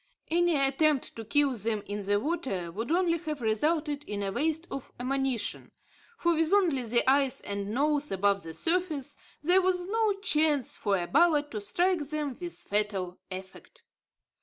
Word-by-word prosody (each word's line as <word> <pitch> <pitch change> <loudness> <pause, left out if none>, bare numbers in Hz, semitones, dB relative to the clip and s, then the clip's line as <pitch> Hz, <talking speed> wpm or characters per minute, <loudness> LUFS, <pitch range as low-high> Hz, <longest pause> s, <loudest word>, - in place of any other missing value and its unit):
Any 345 -1 +3
attempt 275 +1 +2
to 225 - -6
kill 285 +3 +2
them 215 -2 -2
in 205 0 -4
the 205 +1 +2
water 230 - -2
would 225 - -4
only 340 -1 +2
have 305 -3 -4
resulted 295 +6 0
in 205 -1 -4
a 195 - -2
waste 320 - 0
of 275 - -6
ammunition; 265 -2 -2 0.5
for, 340 0 +2
with 325 0 +1
only 345 -10 +3
the 235 +1 +1
eyes 270 -1 +3
and 200 0 -4
nose 290 +4 +1
above 200 +1 +2
the 165 -2 -7
surface, 325 -5 -1 0.3
there 360 +4 +5
was 360 -1 +1
no 435 +1 +1
chance 305 - +1
for 200 -2 0
a 175 - -2
bullet 295 - +3
to 215 - -4
strike 345 - +1
them 300 -4 -3
with 345 -1 -3
fatal 200 -3 -1
effect. 190 - -10
280 Hz, 165 wpm, -29 LUFS, 210-330 Hz, 0.5 s, there